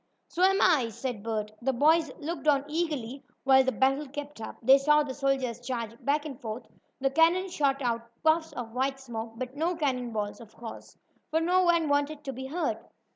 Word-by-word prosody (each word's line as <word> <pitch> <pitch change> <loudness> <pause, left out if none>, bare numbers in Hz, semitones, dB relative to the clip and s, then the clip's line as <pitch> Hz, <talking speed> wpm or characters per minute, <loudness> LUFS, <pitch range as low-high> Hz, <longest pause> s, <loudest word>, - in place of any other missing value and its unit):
"So 350 - -4
am 385 +1 +5
I," 280 -10 +4
said 235 -1 -5
Bert 215 -1 -3
The 265 +2 +1
boys 310 +3 +3
looked 320 +1 -5
on 285 -1 +4
eagerly 295 -5 -3 0.2
while 265 0 +6
the 260 - +1
battle 270 +3 +1
kept 290 -2 -7
up. - - -6
They 270 +4 +7
saw 300 +2 +4
the 270 -2 -5
soldiers 265 -4 -1
charge 235 -3 -4
back 290 +2 +1
and 275 -5 -7
forth. 225 +1 -5 0.3
The 270 0 +1
cannon 335 +5 +3
shot 280 -4 0
out 235 -1 -1
puffs 320 +1 +3
of 230 -2 -6
white 270 +2 -1
smoke, 230 -3 -6
but 255 +2 -6
no 335 +4 0
cannon 255 -6 -1
balls, 210 +1 -3
of 225 -2 -14
course, 230 -1 -10 0.3
for 320 - +2
no 360 +3 +3
one 340 -3 +3
wanted 290 +1 0
to 270 -2 -4
be 265 +1 -6
hurt. 335 +6 -2
275 Hz, 200 wpm, -28 LUFS, 245-310 Hz, 0.3 s, They